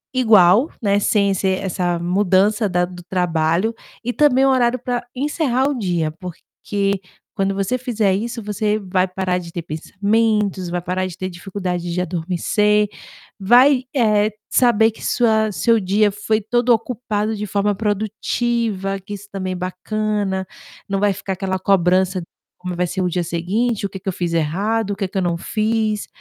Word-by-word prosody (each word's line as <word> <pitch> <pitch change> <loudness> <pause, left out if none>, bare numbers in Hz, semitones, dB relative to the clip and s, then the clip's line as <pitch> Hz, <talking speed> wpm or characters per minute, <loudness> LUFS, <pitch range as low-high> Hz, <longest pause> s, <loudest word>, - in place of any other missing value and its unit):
igual, 220 - +5
né, 205 -3 +2
sem 200 -1 +2
ser 190 0 0
essa 180 -2 -1
mudança 195 +4 +2
da 180 -1 +1
do 180 0 -10
trabalho, 175 +3 0 0.3
e 245 +1 -2
também 270 -2 +4
um - - +4
horário 250 -2 +2
pra 245 0 -3
encerrar 270 -1 0
o 285 -2 -1
dia, 175 -7 -1
porque 195 +3 -4 0.3
quando 195 0 -1
você 200 +6 -1
fizer 225 -6 +1
isso 230 +4 -3
você 210 +1 0
vai 185 -2 0
parar 185 -1 -1
de 170 -1 -9
ter 170 0 -5
pensamentos, 200 +4 0
vai 175 0 -2
parar 185 +1 -1
de 180 -1 -9
ter 185 0 -4
dificuldade 180 -1 -4
de 175 - -2
adormecer, 185 +5 +1 0.5
vai, 250 +6 +5
eh, 215 -4 +3 0.2
saber 230 -3 +4
que 220 - -14
sua 220 -3 +2
seu 230 +3 +2
dia 205 +2 +2
foi 210 +2 0
todo 240 +3 0
ocupado 220 -2 0
de 210 0 -4
forma 200 +1 +1
produtiva, 210 0 -1
que 205 +2 -7
isso 200 0 -12
também 185 -1 -3
é - - -4
bacana, 190 +1 -2 0.4
não 195 0 -1
vai 205 0 +3
ficar 195 0 -4
aquela 190 0 -2
cobrança: 185 0 +2 0.4
"Como 180 0 -5
vai 180 +1 0
ser 185 +2 -3
o 180 - +1
dia 175 0 -1
seguinte? 195 +8 -1
O - - -18
que 195 - -7
que 190 - -15
eu 185 - -2
fiz 175 -2 -2
errado? 200 +7 0
O - - -2
que 195 -1 -2
que 195 - -6
eu 190 - +1
não 170 -1 0
fiz?". 215 +1 -1
200 Hz, 175 wpm, -20 LUFS, 185-220 Hz, 0.5 s, igual